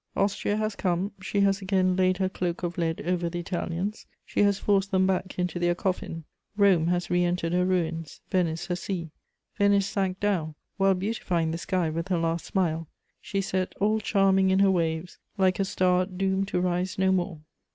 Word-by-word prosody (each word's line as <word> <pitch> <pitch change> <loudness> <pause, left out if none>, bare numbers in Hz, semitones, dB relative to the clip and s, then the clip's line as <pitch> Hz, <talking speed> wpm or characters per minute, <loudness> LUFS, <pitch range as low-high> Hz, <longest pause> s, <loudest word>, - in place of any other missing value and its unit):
Austria 200 +1 0
has 215 -1 -1
come; 185 +2 -1
she 200 +1 0
has 200 0 +2
again 185 -1 +2
laid 185 0 +2
her 190 0 +1
cloak 180 -2 -3
of 175 0 -2
lead 165 -1 -1
over 175 -1 0
the 175 - -5
Italians; 175 +3 -3 0.2
she - - -4
has 200 -1 +4
forced 195 -1 +1
them 190 -1 +3
back 190 0 -1
into 180 -1 -1
their 175 0 +2
coffin. 175 -3 -3 0.3
Rome 190 -6 +4
has 175 0 0
re 175 0 +3
entered 175 -1 0
her 180 0 +2
ruins, 165 -4 -1
Venice 170 -4 0
her 175 - -2
sea. 175 -3 -4 0.5
Venice 200 -1 +4
sank 195 -2 -1
down, 175 -7 0 0.2
while 195 -1 +4
beautifying 180 -4 -1
the 165 - -3
sky 175 -3 0
with 165 +3 -3
her 185 -2 +1
last 165 0 -1
smile; 165 -4 -1 0.3
she 195 - -2
set 185 -1 -2
all 215 +2 +2
charming 195 -2 +3
in 190 - +3
her 195 0 +5
waves, 165 -1 -1 0.2
like 190 -1 +2
a 195 - +2
star 185 -1 +2
doomed 190 0 -1
to 180 - -1
rise 180 +1 -1
no 190 0 +3
more. 175 -4 -1
185 Hz, 195 wpm, -27 LUFS, 175-195 Hz, 0.5 s, her